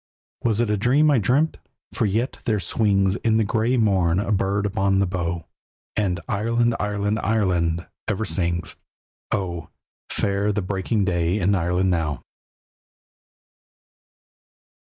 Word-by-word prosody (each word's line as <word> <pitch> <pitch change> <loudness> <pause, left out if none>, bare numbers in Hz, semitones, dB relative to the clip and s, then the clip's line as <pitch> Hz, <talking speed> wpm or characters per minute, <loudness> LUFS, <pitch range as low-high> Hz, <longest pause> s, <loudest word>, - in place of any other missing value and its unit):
Was 115 -2 +1
it 120 -3 +1
a 105 - +1
dream 140 +8 +3
I 135 - +4
dreamt? 140 +10 +1 0.4
For 115 -5 +1
yet 115 +6 -1
there 110 -3 +1
swings 100 -1 +1
In 110 -1 +1
the 110 - +3
grey 115 +5 +1
morn 95 -6 +2
a 100 - -1
bird 100 0 +1
upon 100 -1 +1
the 100 - +3
bough, 85 -3 -3 0.5
And 95 -4 0
"Ireland! 115 +3 +1
Ireland! 105 +1 -1
Ireland!" 90 -6 +1 0.2
ever 105 +1 -1
sings. 85 -5 -1 0.5
Oh! 85 -5 -2 0.4
fair 100 +1 0
the 105 -1 -1
breaking 100 +2 -1
day 85 0 +1
in 100 +1 +2
Ireland 90 +1 +1
now. 80 -6 -1
100 Hz, 135 wpm, -23 LUFS, 90-110 Hz, 0.5 s, I